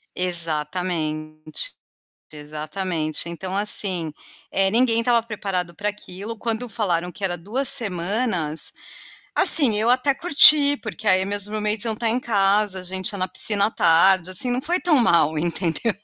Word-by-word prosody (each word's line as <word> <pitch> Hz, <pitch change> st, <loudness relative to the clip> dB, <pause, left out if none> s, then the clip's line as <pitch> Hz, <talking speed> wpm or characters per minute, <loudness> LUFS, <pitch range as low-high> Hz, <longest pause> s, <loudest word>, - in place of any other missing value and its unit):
Exatamente, 155 Hz, -, 0 dB, 0.6 s
exatamente, 155 Hz, +2 st, -5 dB
então 185 Hz, +3 st, -7 dB
assim, 190 Hz, -5 st, 0 dB, 0.4 s
eh, 195 Hz, 0 st, +1 dB
ninguém 230 Hz, 0 st, +1 dB
estava 235 Hz, 0 st, +1 dB
preparado 195 Hz, -6 st, -5 dB
para 205 Hz, +1 st, -3 dB
aquilo, 205 Hz, +2 st, -9 dB
quando 230 Hz, +2 st, -4 dB
falaram 180 Hz, -6 st, -3 dB
que 200 Hz, -, -13 dB
era 175 Hz, -2 st, -2 dB
2 235 Hz, +10 st, -3 dB
semanas, 180 Hz, -5 st, -2 dB, 0.6 s
assim, 270 Hz, -10 st, +8 dB
eu 225 Hz, +3 st, 0 dB
até 265 Hz, +2 st, +1 dB
curti, 285 Hz, -2 st, +5 dB
porque 220 Hz, -3 st, -7 dB
aí 185 Hz, 0 st, +2 dB
meus 205 Hz, 0 st, -4 dB
roommates 215 Hz, 0 st, -2 dB
iam 225 Hz, -1 st, -3 dB
estar 230 Hz, +1 st, -3 dB
em 245 Hz, +3 st, -2 dB
casa, 200 Hz, -3 st, 0 dB
a -, -, -8 dB
gente 185 Hz, +3 st, -5 dB
ia 200 Hz, -, -8 dB
na 185 Hz, -, -1 dB
piscina 200 Hz, +2 st, +2 dB
à -, -, -4 dB
tarde, 185 Hz, +2 st, +2 dB
assim, 185 Hz, +7 st, +1 dB
não 255 Hz, +2 st, -3 dB
foi 350 Hz, +4 st, -1 dB
tão 350 Hz, -4 st, +1 dB
mal, 165 Hz, -9 st, +1 dB
entendeu? 170 Hz, +6 st, -2 dB
195 Hz, 155 wpm, -20 LUFS, 170-225 Hz, 0.6 s, assim